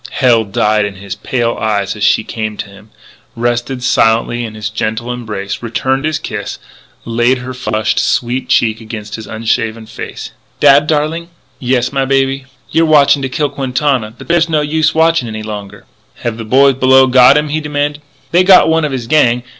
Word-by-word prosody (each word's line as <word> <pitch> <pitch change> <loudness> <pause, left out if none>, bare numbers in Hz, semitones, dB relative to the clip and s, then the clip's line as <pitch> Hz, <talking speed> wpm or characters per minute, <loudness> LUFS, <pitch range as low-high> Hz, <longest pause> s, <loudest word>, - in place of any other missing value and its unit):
Hell 120 -4 +2
died 105 +1 +1
in 100 -1 -4
his 100 0 -7
pale 120 +2 -2
eyes 105 -2 -1
as 105 - -5
she 105 - +3
came 110 -2 -5
to - - -5
him, 100 +2 -16 0.5
rested 120 +2 -2
silently 120 0 +1
in 110 -2 -7
his 105 -1 -5
gentle 110 +3 -3
embrace, 105 -5 -5
returned 130 +4 -1
his 155 -1 0
kiss, 105 -1 -6 0.5
laid 120 +3 +1
her 125 +1 -7
flushed, 115 -3 -1
sweet 125 +1 -1
cheek 110 -3 +1
against 110 -1 -8
his 110 - -7
unshaven 115 0 -2
face. 110 - -8 0.3
"Dad, 145 +1 +5
darling?" 160 +3 -1 0.3
"Yes, 125 +1 0
my 135 -1 +1
baby 135 0 0
" - - -29
"You're 165 +1 +3
watching 145 -2 +4
to 130 - -2
kill 145 +3 -1
Quintana. 130 -4 -1
But - - -12
there's 170 0 +2
no 155 -2 +1
use 155 +1 0
watching 160 -5 +2
any 110 -1 -6
longer." 105 -2 -8 0.4
"Have 115 -2 -2
the 115 - -6
boys 135 +3 +4
below 130 0 +5
got 130 +2 +6
him?" 150 0 -1
he 155 +2 -1
demanded. 145 0 -2 0.3
"They 175 +2 +4
got 185 -3 +6
one 160 -1 +2
of 150 - -3
his 130 -3 -4
gang. 125 -3 +2
125 Hz, 185 wpm, -14 LUFS, 110-140 Hz, 0.5 s, got